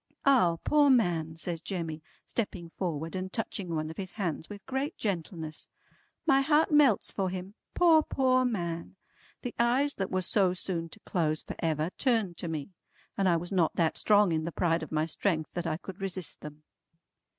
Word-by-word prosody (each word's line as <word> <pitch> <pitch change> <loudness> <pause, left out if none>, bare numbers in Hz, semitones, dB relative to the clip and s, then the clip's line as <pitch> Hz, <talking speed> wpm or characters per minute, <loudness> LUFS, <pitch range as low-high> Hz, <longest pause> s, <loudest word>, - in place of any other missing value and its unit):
"Ah 210 -12 +5
poor 295 -1 +4
man!" 170 -11 +2
says 165 0 -4
Jemmy 165 -4 -4 0.2
stepping 175 -7 -4
forward 165 -2 -3
and 185 0 -3
touching 205 -4 -3
one 155 0 -2
of - - -12
his 190 -2 -5
hands 170 -7 -3
with 205 -1 -9
great 270 +2 -2
gentleness. 165 -5 -4 0.6
"My 270 0 +5
heart 300 +3 +3
melts 290 -8 +4
for 190 -1 -1
him. 185 +2 -6 0.2
Poor, 330 -3 +6
poor 255 -3 +2
man!" 170 -8 -3 0.5
The 245 - -4
eyes 255 +5 +3
that 190 -1 -2
were 185 0 0
so 190 -2 +2
soon 170 -2 -3
to 220 - -10
close 155 -4 -1
for - - -7
ever 160 +1 0
turned 225 -10 +1
to 175 - -4
me, 155 -1 -4 0.5
and 195 -1 +2
I 170 - +4
was 175 +3 -6
not 175 -5 +2
that 165 -2 +2
strong 205 -3 +4
in 160 -1 0
the 170 - -3
pride 165 0 +1
of 160 - -7
my 155 0 +1
strength 165 -1 -1
that 175 -1 -3
I 155 -1 -1
could 190 +2 -10
resist 185 -5 -3
them. 150 0 -10
180 Hz, 185 wpm, -29 LUFS, 165-220 Hz, 0.6 s, Poor